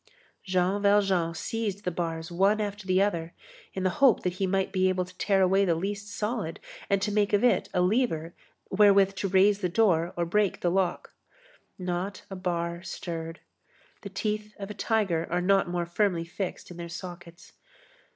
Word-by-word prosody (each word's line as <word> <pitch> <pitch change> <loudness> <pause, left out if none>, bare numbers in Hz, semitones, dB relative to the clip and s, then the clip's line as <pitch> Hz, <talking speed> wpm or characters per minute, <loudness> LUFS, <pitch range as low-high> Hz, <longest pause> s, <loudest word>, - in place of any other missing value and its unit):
Jean 185 +1 +1
Valjean 195 -5 +2
seized 210 0 -3
the 180 - 0
bars 165 0 -4
one 195 +5 +3
after 205 -1 -4
the 185 0 +3
other, 170 -5 0 0.4
in 190 - -2
the 185 - +2
hope 260 -7 +5
that 180 - 0
he 195 - +1
might 190 0 0
be 185 -1 +2
able 185 -1 0
to 185 0 -16
tear 195 -2 +3
away 190 +2 +4
the 175 -4 +2
least 200 +4 -4
solid, 210 -4 -3 0.3
and 200 -1 +2
to 210 - 0
make 205 0 +1
of 205 - +3
it 245 - +3
a 180 - +1
lever 180 -5 +1 0.4
wherewith 195 -1 +5
to 195 +1 -2
raise 195 +2 +4
the 180 -3 -1
door 175 -4 +2
or 175 - +1
to 170 - -5
break 210 -2 +1
the 175 - +1
lock. 190 -1 -1 0.6
Not 185 +1 -3
a - - -4
bar 170 -2 -2
stirred. 165 -3 -6 0.6
The 200 - -7
teeth 210 +2 -3
of 200 0 -6
a - - -5
tiger 200 -8 0
are 175 - 0
not 195 0 +2
more 175 -1 -1
firmly 175 -1 0
fixed 180 +1 -5
in 175 - -10
their 170 -1 -6
sockets. 175 -1 -10
190 Hz, 190 wpm, -27 LUFS, 175-205 Hz, 0.6 s, hope